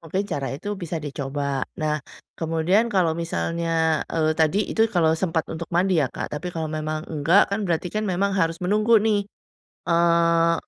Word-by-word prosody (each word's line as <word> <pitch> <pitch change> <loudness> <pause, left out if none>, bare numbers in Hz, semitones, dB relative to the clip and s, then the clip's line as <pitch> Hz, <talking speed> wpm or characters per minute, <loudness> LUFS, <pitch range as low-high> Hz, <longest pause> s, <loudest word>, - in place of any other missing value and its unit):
mungkin 175 +4 -2
cara 140 -4 -2
itu 180 +8 -7
bisa 170 -2 -4
dicoba. 140 -1 -3 0.2
Nah, 155 0 0 0.4
kemudian 165 +6 +2
kalau 175 -4 +2
misalnya, 165 -1 0
eee, 155 -1 +2
tadi 160 +4 +3
itu 225 - +2
kalau 160 -2 +4
sempat 165 -3 0
untuk 165 +1 -5
mandi 180 -1 +3
ya, 140 - +3
Kak. - - -5
Tapi 180 - -5
kalau 160 -1 -2
memang 155 0 -3
enggak 165 +7 +3
kan 200 - 0
berarti 175 0 -1
kan 215 0 0
memang 195 +2 0
harus 165 -1 +1
menunggu 215 +5 +3
nih. 210 -2 +1 0.7
Eee 170 0 +3
165 Hz, 170 wpm, -23 LUFS, 155-180 Hz, 0.7 s, kalau